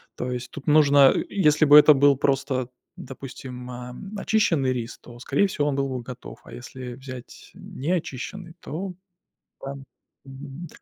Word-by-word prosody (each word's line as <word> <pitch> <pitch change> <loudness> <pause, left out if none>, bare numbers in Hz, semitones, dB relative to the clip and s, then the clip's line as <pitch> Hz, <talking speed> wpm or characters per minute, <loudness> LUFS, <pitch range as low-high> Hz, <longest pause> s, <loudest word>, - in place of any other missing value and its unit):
То 125 - -4
есть 125 0 -5
тут 140 - -10
нужно, 145 -3 +6
э, - - 0
если 155 -6 +3
бы 145 0 +9
это 150 0 +9
был 140 0 +4
просто, 135 -2 0 0.3
допустим, 130 -1 -9
эм, 125 +11 -8
очищенный 165 -12 +1
рис, 120 -2 -5
то 120 -1 -14
скорее 140 +9 +1
всего 150 -6 -1
он 145 - 0
был 135 0 0
бы 130 -1 -4
готов, 125 +1 -10
а - - -13
если 125 0 -8
взять 130 -1 -11
неочищенный, 170 +3 -5
то 180 +6 -5 0.7
Да, 135 - -4
м. 140 0 -10 0.4
Мгм. 135 +4 -9
135 Hz, 160 wpm, -24 LUFS, 125-150 Hz, 0.7 s, бы